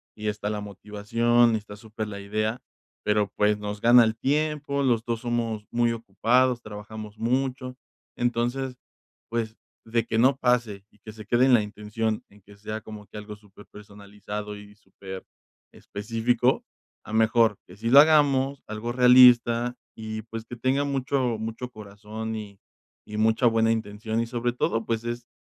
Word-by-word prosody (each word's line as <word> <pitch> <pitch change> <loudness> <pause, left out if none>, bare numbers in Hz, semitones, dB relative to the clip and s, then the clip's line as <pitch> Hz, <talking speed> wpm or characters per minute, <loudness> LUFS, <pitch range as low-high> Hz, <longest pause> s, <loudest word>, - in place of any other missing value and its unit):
y 105 0 -5
está 105 0 -3
la 105 - -2
motivación, 110 +4 +1
está 105 -1 -10
súper 110 0 -6
la 100 -1 -7
idea, 110 +3 -2 0.4
pero, 105 -1 +1
pues, 105 0 +2
nos 105 0 -5
gana 120 +1 +7
el 110 0 -1
tiempo, 145 +1 0
los 120 -4 +2
2 115 -1 -2
somos 115 -3 -2
muy 120 0 +2
ocupados, 120 +3 +1
trabajamos 105 0 -9
mucho, 130 +1 -1 0.4
entonces, 120 +2 -1 0.5
pues, 115 -1 -3 0.3
de 115 0 0
que 115 - -2
no 130 +3 +4
pase 120 -6 0
y 105 - -27
que 110 - -10
se 110 -1 -11
quede 120 +4 +3
en 130 - +4
la 110 - +4
intención 105 +1 -3
en 105 +1 -20
que 100 +1 -17
sea 110 +1 -5
como 105 -1 -10
que - - -11
algo 105 0 -8
súper 105 -1 -18
personalizado 105 0 -8
y 105 0 -13
súper 95 -2 -10 0.5
específico, 115 +4 0 0.4
a - - -9
mejor 110 -1 +3
que 90 - -13
sí 115 +2 -2
lo 140 +3 +9
hagamos, 140 -3 +4
algo 110 +2 -4
realista, 125 -1 +6 0.2
y 110 0 -6
pues, 115 0 -8
que 120 - -8
tenga 130 +4 +1
mucho 135 -3 0
mucho 115 +3 -5
corazón 110 0 -7
y 105 -2 -8 0.5
y 105 - -7
mucha 110 +3 +2
buena 115 0 +3
intención, 110 0 -2
y - - -1
sobre 120 0 -2
todo, 115 -2 -1
pues, 115 -1 -2
es 120 0 -5
115 Hz, 165 wpm, -26 LUFS, 105-120 Hz, 0.5 s, lo